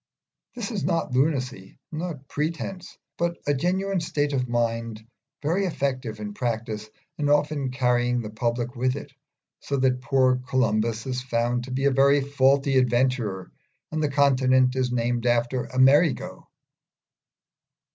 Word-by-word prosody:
This 235 -3 -4
is 210 -5 -3
not 165 -5 0
lunacy, 130 -7 -1
nor 165 +1 -4
pretence, 170 +4 -4 0.2
but 170 0 0
a 145 - +2
genuine 185 +6 0
state 145 -3 -1
of 125 -2 -1
mind 115 -2 -2 0.4
very 175 +7 +1
effective 130 -9 -3
in 105 -1 -5
practice, 110 -2 -3 0.3
and 145 -1 +1
often 145 -2 +1
carrying 125 -1 +1
the 110 -3 -5
public 120 +2 -2
with 130 +1 0
it, 145 -1 -8 0.5
so 140 - -3
that 130 0 +3
the 125 -1 +1
poor 130 -1 +3
Columbus 115 -4 0
is 130 -1 -2
found 120 0 -1
to 130 - -9
be 135 +2 -1
a 140 - +4
very 140 +2 +4
faulty 135 0 +3
adventurer, 120 -6 0 0.4
and 155 0 -2
the 150 - +1
continent 130 -2 +3
is 130 -1 0
named 120 0 0
after 120 +1 0
Amerigo. 135 +4 +3
130 Hz, 145 wpm, -25 LUFS, 120-145 Hz, 0.5 s, a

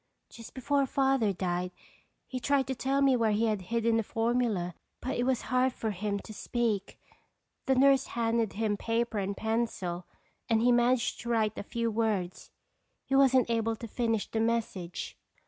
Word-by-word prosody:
"Just 230 - -12
before 275 +1 +1
Father 265 -6 +2
died 180 -1 -2 0.6
he 255 - -5
tried 275 +1 +2
to 265 - -2
tell 270 +2 0
where 240 -5 +3
he 220 +2 +2
had 215 -3 0
hidden 230 +3 +1
the - - +2
formula 225 -6 0 0.3
but 260 - -3
it 245 - 0
was 260 -2 +1
hard 255 0 +3
for 220 -3 -3
him 200 +1 -2
to 215 - -10
speak. 220 -2 -2 0.7
The 265 - +4
nurse 270 +1 +4
handed 230 -2 +1
him 210 -1 -1
paper 230 0 -1
and 195 0 -3
pencil 220 -6 -2 0.4
and 225 -1 +3
he 245 - +5
managed 240 0 +2
to 235 - -6
write 220 -2 +1
a - - -4
few 230 +2 -2
words. 210 -5 -1 0.6
He 270 - 0
wasn't 260 -3 +4
able 225 -1 0
to 230 - -8
finish 225 -1 -1
the 225 - -2
message." 220 -6 -2
230 Hz, 170 wpm, -30 LUFS, 210-250 Hz, 0.7 s, he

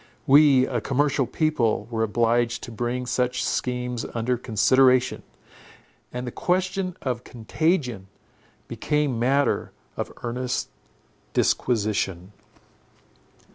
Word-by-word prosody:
We, 140 -2 +6
a 120 -3 -2
commercial 140 +1 +1
people, 120 -9 0
were 110 -1 -1
obliged 115 +1 +1
to - - -7
bring 120 +3 -3
such 125 +1 -1
schemes 125 -1 -2
under 120 +2 0
consideration; 125 +3 +3 0.9
and 125 +1 -5
the 125 - -4
question 185 +2 -1
of 125 -2 -2
contagion 125 - -1 0.6
became 150 -5 -1
matter 135 +4 +1 0.2
of - - -4
earnest 125 +1 -2 0.6
disquisition. 100 -5 0
125 Hz, 95 wpm, -24 LUFS, 115-135 Hz, 0.9 s, We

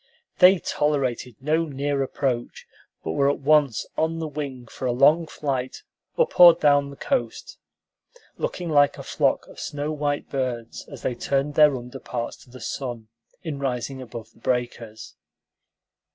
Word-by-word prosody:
They 185 +1 +8
tolerated 135 -7 -1
no 155 +4 +1
near 140 -1 -2
approach, 130 -2 -2 0.4
but 80 - -3
were 140 +11 +2
at 145 - 0
once 145 -5 +3
on 160 +1 0
the 165 -1 -3
wing 140 -4 -6
for 130 +2 -5
a - - +2
long 150 +7 +4
flight 135 -4 -4 0.3
up 485 - 0
or 175 -1 +10
down 145 -1 +3
the 140 - -10
coast, 280 - -3 0.8
looking 175 - -4
like 145 -3 +3
a - - -7
flock - - 0
of - - -14
snow 145 +1 -3
white 145 -1 -2
birds 125 -4 -4
as - - -11
they 125 - 0
turned 140 +4 -1
their 150 -2 +5
under 125 +1 -8
parts 120 -1 -5
to - - -19
the 130 +1 -12
sun 120 -5 -5 0.3
in 155 -5 -4
rising 130 0 -3
above 115 -2 -9
the - - -24
breakers. 120 -3 -3
140 Hz, 160 wpm, -24 LUFS, 125-150 Hz, 0.8 s, or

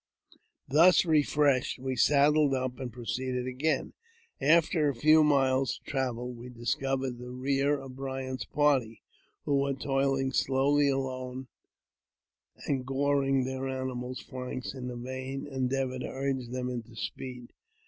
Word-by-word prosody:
Thus 165 +7 +6
refreshed, 145 -4 +2
we 130 0 -3
saddled 145 +1 +4
up 130 0 -3
and 130 -2 -5
proceeded 125 +1 -3
again. 135 +3 -1 0.5
After 160 0 +4
a 140 - -2
few 155 +6 +5
miles 135 -3 +2
travel 125 -3 -2
we 120 +1 -10
discovered 130 +1 -2
the 125 0 -8
rear 135 +3 0
of 135 -1 -10
Bryant's 130 -1 -4
party, 135 -7 +1 0.4
who 140 -1 +2
were 140 0 0
toiling 135 0 0
slowly 140 +2 +3
along, 130 -1 -3 1.2
and 135 -2 -1
goring 135 0 +1
their 130 +1 -3
animals' 130 -1 -4
flanks 130 -1 -6
in 130 -2 -6
the 125 -1 -5
vain 130 +2 -5
endeavour 130 -1 -2
to - - -4
urge 135 -2 -2
them 125 +1 -3
into 120 -2 -6
speed. 125 +1 -6
130 Hz, 130 wpm, -29 LUFS, 125-140 Hz, 1.2 s, Thus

